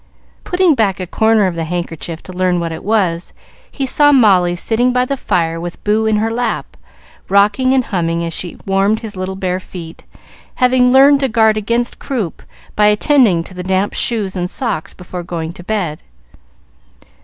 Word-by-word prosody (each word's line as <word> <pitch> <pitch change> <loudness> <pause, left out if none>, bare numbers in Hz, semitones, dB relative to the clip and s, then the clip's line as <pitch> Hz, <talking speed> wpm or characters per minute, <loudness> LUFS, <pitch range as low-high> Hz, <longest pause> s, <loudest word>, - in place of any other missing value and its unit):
Putting 360 -2 +2
back 205 -8 0
a 185 - -3
corner 220 +3 +2
of 185 - 0
the 165 -1 -3
handkerchief 165 -1 -5
to 185 - -10
learn 180 -1 +1
what 170 -1 -3
it 160 - -7
was, 185 -5 0 0.4
he 275 - -3
saw 290 +3 +4
Molly 190 -9 +4
sitting 235 +7 +1
by 250 0 +1
the 275 - -2
fire 165 -9 -1
with 175 0 -7
Boo 215 +1 +1
in 220 - +2
her 220 +2 0
lap, 240 +2 -3 0.5
rocking 205 +6 +3
and 265 -1 +3
humming 170 -5 -1
as 165 0 -4
she 175 +1 -6
warmed 195 +3 +1
his 220 -3 -7
little 185 +1 -4
bare 185 -1 -2
feet, 170 -3 -10 0.5
having 250 0 +3
learned 275 +2 +6
to 270 -1 0
guard 220 -1 +3
against 235 +3 -2
croup 225 - -4 0.3
by 210 0 +4
attending 210 - +3
to 185 - -11
the 180 - -6
damp 190 +2 0
shoes 210 -5 -1
and 180 -1 -2
socks 220 - -4
before 180 0 -7
going 170 -1 -5
to 175 - -12
bed. 180 -7 -3
200 Hz, 180 wpm, -16 LUFS, 175-235 Hz, 0.5 s, learned